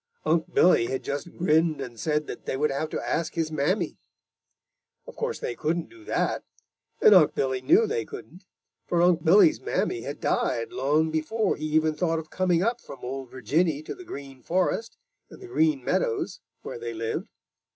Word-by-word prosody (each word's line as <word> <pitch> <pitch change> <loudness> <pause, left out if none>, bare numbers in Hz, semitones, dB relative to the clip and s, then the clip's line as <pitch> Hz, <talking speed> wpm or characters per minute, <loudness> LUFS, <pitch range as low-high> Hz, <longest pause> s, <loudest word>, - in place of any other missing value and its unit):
Unc' 160 +1 +1
Billy 170 -10 +5
had 130 - -3
just 145 +4 -4
grinned 160 -2 +2
and 120 -2 -7
said 150 +2 0
that - - -8
they - - -1
would 150 +1 +1
have 155 +3 -2
to - - -3
ask 165 -1 -1
his 165 -2 -1
mammy. 160 +4 0 1.1
Of - - -11
course - - -2
they - - -4
couldn't 165 - -2
do 345 -1 -15
that, - - -1 0.6
and 210 - +7
Unc' 175 -6 +6
Billy 130 -1 0
knew 400 +7 +5
they 450 +1 -1
couldn't, 195 - -11 0.4
for 175 -1 +2
Unc' 175 -3 +3
Billy's 210 - +5
mammy 365 - -1
had - - -6
died 450 -6 0
long 155 - +1
before 190 +7 0
he 155 - -5
even 155 0 +2
thought 165 +1 0
of 160 -1 -7
coming 180 -2 +2
up 235 +3 0
from 135 - -11
Ol' 130 +1 -5
Virginny 145 +6 0
to - - -5
the 365 - -11
Green 140 - -9
Forest 185 +6 -1 0.3
and - - -13
the 385 - -10
Green 320 -6 +2
Meadows 450 -8 -1 0.2
where 475 - -6
they 450 -3 -5
lived. 450 +6 -3
165 Hz, 185 wpm, -26 LUFS, 150-230 Hz, 1.1 s, and